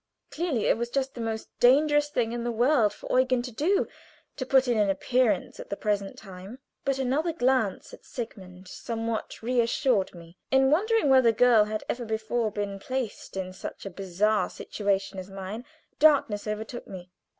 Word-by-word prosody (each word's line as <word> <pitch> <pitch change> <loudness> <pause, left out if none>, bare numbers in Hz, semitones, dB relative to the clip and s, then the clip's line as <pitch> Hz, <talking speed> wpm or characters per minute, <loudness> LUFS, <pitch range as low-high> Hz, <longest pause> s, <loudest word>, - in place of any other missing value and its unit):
Clearly 310 -9 -1
it - - +3
was 235 0 -2
just 270 +1 -1
the 240 - -6
most 225 -1 -3
dangerous 295 +3 +4
thing 235 -5 0
in 240 0 -3
the 240 - -1
world 235 -1 +3
for 255 - -1
Eugen 255 -1 +2
to 250 - -6
do 330 - +1 0.5
to 255 - -5
put 265 -1 +4
in 240 - +2
an 205 -1 +3
appearance 230 0 +1
at - - -9
the 200 - -3
present 205 -2 -2
time. 195 +3 -10 0.3
But 275 -1 0
another 270 +6 0
glance 255 - 0
at - - -12
Sigmund 190 -6 -8
somewhat 225 +3 -4
reassured 235 -4 +1
me. 170 +1 -14
In 265 0 +4
wondering 435 +3 +2
whether 260 -3 +6
girl 225 -1 +5
had 215 0 -4
ever 240 - -2
before 220 +1 -1
been 205 -1 -4
placed 255 -4 -4
in 185 -1 -4
such 190 - -8
a 195 - -5
bizarre 195 +3 0
situation 195 -2 -2
as 185 +1 -8
mine, 195 +5 -7 0.3
darkness 275 -9 +4
overtook 220 +3 -5
me. 180 -1 -10
230 Hz, 175 wpm, -27 LUFS, 200-260 Hz, 0.5 s, whether